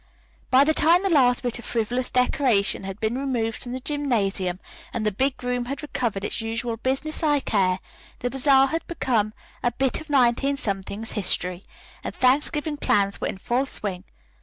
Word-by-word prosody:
By 260 +2 +6
the 315 +2 +2
time 335 +5 +4
the 390 - +1
last 250 -5 +4
bit 245 -1 -2
of - - -10
frivolous 245 +2 0
decoration 250 -6 +2
had 195 +1 -6
been 225 +4 -1
removed 235 -5 -2
from 245 - -6
the 255 - -3
gymnasium, 210 -11 -1 0.3
and 215 - -3
the 210 - +2
big 260 +6 -1
room 245 0 -1
had 275 +4 -5
recovered 230 -8 -2
its - - -2
usual 225 +1 -3
business 270 +6 -1
like 295 -6 +1
air, 185 -3 +3 0.4
the 245 - -3
bazaar 270 +1 +4
had 325 +3 -3
become 230 -10 0 0.3
a 245 - +2
bit 265 +4 -1
of 315 - -13
19 275 0 +3 0.5
's - - +1
history, 180 -3 0 0.4
and - - -5
Thanksgiving 295 +4 +2
plans 200 -8 +1
were - - 0
in - - -4
full 245 +7 -1
swing. 190 -7 -3
245 Hz, 180 wpm, -24 LUFS, 215-275 Hz, 0.5 s, By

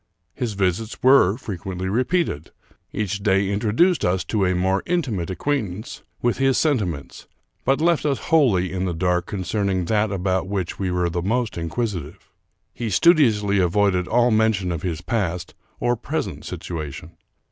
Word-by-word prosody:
His 120 -4 -3
visits 100 +3 -2
were 125 -7 +5
frequently 95 -5 -5
repeated. 125 - 0 0.4
Each 100 -1 -2
day 100 -1 +2
intro 105 +2 0
duced 175 - +3
us 90 0 +1
to 100 +1 0
a 90 - +1
more 95 +2 +1
intimate 125 - -1
acquaintance 110 -1 -3 0.2
with 120 +1 +1
his 135 -1 +3
senti 140 -10 +2
ments, 80 -6 -7 0.4
but 135 - +2
left 170 0 +2
us 140 -3 +1 0.2
wholly 100 - +3
in 95 0 -1
the 90 -2 -2
dark 90 +1 0
concerning 95 -1 -1
that 105 +2 +1
about 95 -1 -1
which 95 -3 -3
we 95 -2 -1
were 90 -1 0
most 115 +4 -1
inquisitive. 85 -2 -4 0.4
He 115 -2 -4
studiously 105 - +4
avoided 90 0 +2
all 120 +1 +3
mention 110 -4 +2
of 85 - -3
his 85 -3 -3
past 90 -4 -2 0.3
or 120 0 +1
present - - -4
situation. 80 -1 -6
100 Hz, 155 wpm, -22 LUFS, 90-120 Hz, 0.4 s, were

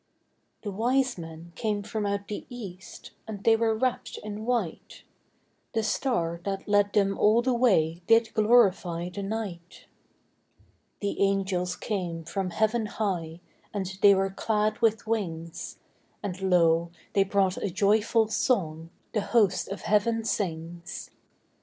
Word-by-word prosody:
The 205 - -3
wise 250 +5 +1
men 165 +1 -9
came 210 0 -1
from 215 0 -2
out 200 0 -2
the 210 - -6
east, 190 -7 -9 0.2
And 205 -2 -7
they 225 - +6
were 225 -1 +1
wrapped 255 +1 -1
in 210 +1 -6
white; 235 -9 -2 0.7
The 225 -1 +1
star 175 -8 -1
that 195 0 -4
led 205 0 +3
them 195 -1 +3
all 220 +3 +4
the 255 0 +2
way 180 -9 +2
Did 225 0 +4
glorify 195 -6 +3
the 200 +3 -6
night. 195 -4 -5 1.2
The 200 -1 -2
angels 190 -2 +1
came 180 -5 -3
from 185 +3 -3
heaven 220 +4 +1
high, 175 -6 -3 0.3
And 190 -1 -3
they 200 -1 +8
were 195 0 0
clad 215 +1 0
with 225 -2 +2
wings; 170 -7 -3 0.5
And 190 -1 -3
lo, 170 -1 +4 0.2
they 195 - +4
brought 195 -1 +1
a 200 - -2
joyful 215 +4 +3
song 165 -9 0 0.2
The 215 - +1
host 205 -3 +2
of 195 - -6
heaven 225 +2 +2
sings. 170 -5 -4
200 Hz, 140 wpm, -27 LUFS, 180-220 Hz, 1.2 s, they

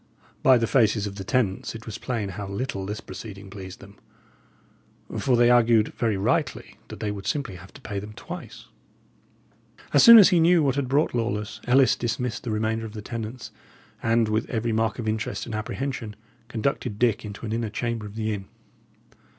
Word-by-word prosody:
By 130 -1 +6
the 115 - +1
faces 110 -4 +2
of 100 -1 -6
the 95 - -5
tenants, 105 -1 -1
it 115 - -9
was 110 - -6
plain 115 -6 -3
how 100 +1 -6
little 100 -1 -4
this 105 +1 -4
proceeding 100 -3 -9
pleased 95 -2 -9
them; 100 +1 -14 1.2
for 130 -3 +2
they 120 0 +5
argued 115 -2 +4
very 110 -4 -1
rightly 95 - -1
that - - -9
they 105 - -2
would 100 -1 -7
simply 135 -11 -2
have 90 +3 -14
to 140 - -12
pay 100 -5 -4
them 105 +2 -9
twice. 170 +10 -9 1.3
As - - +6
soon 235 -2 +11
as 205 - +9
he 180 -4 +4
knew 165 0 +5
what 135 -2 +2
had 140 -1 -1
brought 140 +4 +1
Lawless, 115 -3 -2
Ellis 130 0 +5
dismissed 120 +1 -2
the - - -3
remainder 110 +1 -1
of 105 - -12
the 105 -2 -7
tenants, 115 +2 -6 0.5
and, 115 0 +2
with 110 +1 -1
every 115 0 -1
mark 110 0 0
of 115 -3 -4
interest 110 0 -2
and 120 - -7
apprehension, 110 0 -4 0.3
conducted 115 -1 -2
Dick 115 -2 +1
into 105 +1 -7
an 110 - -3
inner 115 -1 -1
chamber 115 0 -3
of 105 - -12
the 110 -1 -1
inn. 100 -2 -5
110 Hz, 190 wpm, -25 LUFS, 105-125 Hz, 1.3 s, soon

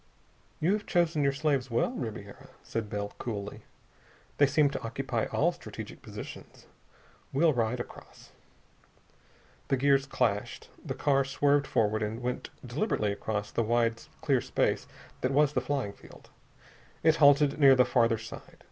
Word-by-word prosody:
"You 170 +6 +2
have 210 0 -3
chosen 170 -4 +2
your 140 -1 +3
slaves 140 -2 0
well, 120 - +1
Ribiera," 110 - -7
said 110 -2 -4
Bell 100 0 -4
coolly. 105 -3 -5 0.8
"They 145 - +6
seem 145 +1 +3
to 140 - -4
occupy 115 0 -2
all - - +1
strategic - - -9
positions. - - -10 0.7
We'll 155 +3 +3
ride 120 0 0
across." 120 - -10 1.4
The 135 - +1
gears 135 +1 +3
clashed. 115 -6 -1
The - - -4
car 140 -2 +2
swerved 140 +1 +2
forward 110 0 +1
and 110 +2 -2
went 125 0 -4 0.2
deliberately 120 - -1
across 105 +1 -3
the - - 0
wide 115 0 +1 0.2
clear 140 -6 +2
space - - 0 0.3
that 130 - +1
was 145 +1 +3
the 125 - +1
flying 130 -6 -2
field. - - -16 0.7
It 160 0 +4
halted 145 0 +5
near 135 -2 +8
the 125 -1 +5
farther 115 -2 +2
side. 115 +1 -10
130 Hz, 145 wpm, -29 LUFS, 115-145 Hz, 1.4 s, near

